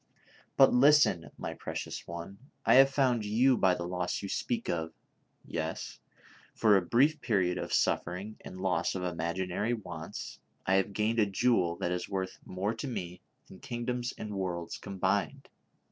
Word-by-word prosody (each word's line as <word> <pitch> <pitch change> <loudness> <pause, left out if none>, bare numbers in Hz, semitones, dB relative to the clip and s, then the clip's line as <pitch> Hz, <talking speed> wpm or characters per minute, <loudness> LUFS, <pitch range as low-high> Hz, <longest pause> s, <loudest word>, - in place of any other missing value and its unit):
" - - -29
But 135 - +7
listen, 135 - +5
my - - -4
precious - - -6
one, 85 +3 -7 0.3
I 115 - +5
have 135 +2 +8
found 130 -5 +2
you 120 +6 +3
by 95 -5 +3
the 85 - -4
loss 90 +2 -2
you 100 - -4
speak 235 - -2
of; 80 -1 -2 0.5
yes, - - -4 0.6
for 105 -2 +5
a 95 - +4
brief 140 - +2
period 95 -7 +1
of - - -5
suffering 95 +5 0
and 95 - -9
loss 95 0 0
of 90 - -3
imaginary 90 +6 -1
wants, 85 -7 -7 0.3
I 95 - +2
have 95 +1 0
gained 110 +3 +1
a 105 - +4
jewel 95 -4 +2
that 90 - -2
is 90 0 -3
worth 95 -1 -3
more 95 +4 -2
to 115 +5 -5
me 90 -8 -5 0.3
than 95 - -13
kingdoms 120 0 -3
and 105 -1 -6
worlds 90 -3 -3
combined 100 -2 -1
100 Hz, 165 wpm, -30 LUFS, 90-120 Hz, 0.6 s, have